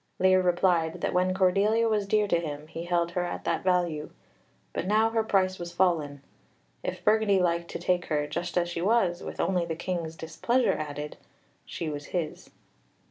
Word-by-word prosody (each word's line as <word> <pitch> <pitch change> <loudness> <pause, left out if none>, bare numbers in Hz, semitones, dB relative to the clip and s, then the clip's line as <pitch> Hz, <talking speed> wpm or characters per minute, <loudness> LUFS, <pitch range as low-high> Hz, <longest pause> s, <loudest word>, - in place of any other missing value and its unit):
Lear 185 0 +4
replied 175 -2 +1
that - - -1
when 180 +1 +2
Cordelia 200 +5 +3
was 210 -3 0
dear 210 0 +2
to 170 -4 +2
him 150 -3 -5
he 165 +2 -7
held 175 -1 +1
her 180 +1 -1
at 175 - -4
that - - -1
value, 175 -5 0 0.6
but 185 - -3
now 220 +2 +3
her 225 -1 +1
price 190 -3 +1
was 175 0 -6
fallen. 155 -6 +1 0.6
If - - -5
Burgundy 215 -2 +4
liked 170 -1 0
to - - -4
take 175 0 0
her, 150 -2 0
just 175 +5 -4
as 175 -1 +2
she 170 -1 -4
was, 190 -3 +2
with - - -7
only 180 -2 +1
the 165 -1 -3
King's 170 -2 -3
displeasure 170 +11 0
added, 150 0 -5 0.5
she 165 - -4
was 145 -1 -4
his. 170 -4 -4
175 Hz, 185 wpm, -28 LUFS, 165-190 Hz, 0.6 s, Lear